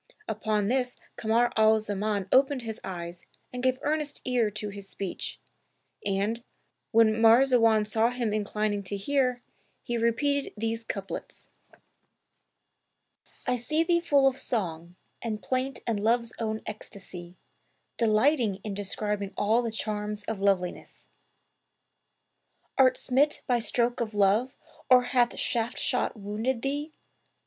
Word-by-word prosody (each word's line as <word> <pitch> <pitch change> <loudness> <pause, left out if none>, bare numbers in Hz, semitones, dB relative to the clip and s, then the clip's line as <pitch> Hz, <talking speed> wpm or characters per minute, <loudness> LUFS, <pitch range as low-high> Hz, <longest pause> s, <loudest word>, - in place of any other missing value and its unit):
'' 430 - -29
Upon 215 -1 0
this 250 +1 0 0.2
Kamar 230 +2 +2
al 220 0 +5
Zaman 205 -1 -2
opened 270 -1 +4
his 225 -1 -5
eyes 175 -2 -6 0.3
and 250 - -4
gave 255 0 +2
earnest 300 0 -1
ear 245 -4 +2
to 210 0 -5
his 200 -1 -9
speech; 195 -3 -5 0.6
and, 205 +4 -1 0.5
when 225 -1 +4
Marzawan 230 -2 +5
saw 220 +2 +2
him 240 -3 -2
inclining 210 0 -1
to 200 +2 -3
hear, 250 +3 0 0.4
he 240 -1 -2
repeated 275 +5 +1
these 225 +1 -2
couplets[FN#287], 200 -3 -6 2.0
"I 250 - +1
see 305 +7 0
thee 340 0 +3
full 285 -5 +3
of 270 0 +2
song 175 -6 -3 0.3
and 220 -2 -3
plaint 255 +6 -2
and 225 -3 0
love's 235 +2 +1
own 220 -1 -2
ecstasy; 190 -4 -9 0.6
Delighting 230 0 +3
in 210 - -4
describing 205 0 -2
all 220 +4 +3
the 235 - -2
charms 210 -1 -2
of 215 -1 -4
loveliness: 195 -3 -1 1.7
Art 260 -1 +5
smit 280 +4 +1
by 245 -2 +2
stroke 235 +2 +1
of 220 -2 -3
Love 205 +6 +2 0.3
or 250 -1 +7
hath 245 -1 +1
shaft 235 +1 0
shot 250 - 0
wounded 220 +5 -2
thee? 290 +3 -2
225 Hz, 130 wpm, -28 LUFS, 210-250 Hz, 2.0 s, or